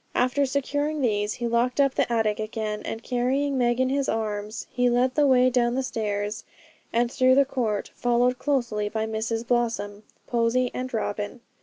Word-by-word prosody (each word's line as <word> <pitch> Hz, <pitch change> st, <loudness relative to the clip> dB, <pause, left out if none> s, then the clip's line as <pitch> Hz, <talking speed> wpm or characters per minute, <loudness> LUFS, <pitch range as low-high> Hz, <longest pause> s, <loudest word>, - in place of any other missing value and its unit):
After 255 Hz, +3 st, +2 dB
securing 290 Hz, +3 st, -1 dB
these 210 Hz, -4 st, +1 dB
he 240 Hz, -, -3 dB
locked 235 Hz, +3 st, +1 dB
up 275 Hz, -2 st, +4 dB
the -, -, 0 dB
attic 220 Hz, -2 st, +1 dB
again, 215 Hz, -1 st, -3 dB
and 225 Hz, +1 st, -5 dB
carrying 265 Hz, +3 st, 0 dB
Meg 240 Hz, -1 st, +1 dB
in 260 Hz, 0 st, +2 dB
his 275 Hz, 0 st, 0 dB
arms, 215 Hz, 0 st, -3 dB
he 245 Hz, 0 st, +2 dB
led 250 Hz, +1 st, +2 dB
the 290 Hz, 0 st, +3 dB
way 255 Hz, -1 st, +5 dB
down 240 Hz, -1 st, +2 dB
the 265 Hz, -, 0 dB
stairs, 210 Hz, -3 st, -3 dB, 0.5 s
and 235 Hz, +1 st, +1 dB
through 255 Hz, 0 st, +4 dB
the 280 Hz, 0 st, +5 dB
court, 230 Hz, -6 st, -2 dB
followed 245 Hz, +1 st, +1 dB
closely 235 Hz, -7 st, 0 dB
by 220 Hz, 0 st, -2 dB
Mrs 225 Hz, +1 st, -2 dB
Blossom, 225 Hz, -4 st, -1 dB, 0.2 s
Posy, 240 Hz, +1 st, +1 dB
and 255 Hz, 0 st, -4 dB
Robin. 215 Hz, 0 st, -3 dB
240 Hz, 175 wpm, -25 LUFS, 220-255 Hz, 0.5 s, way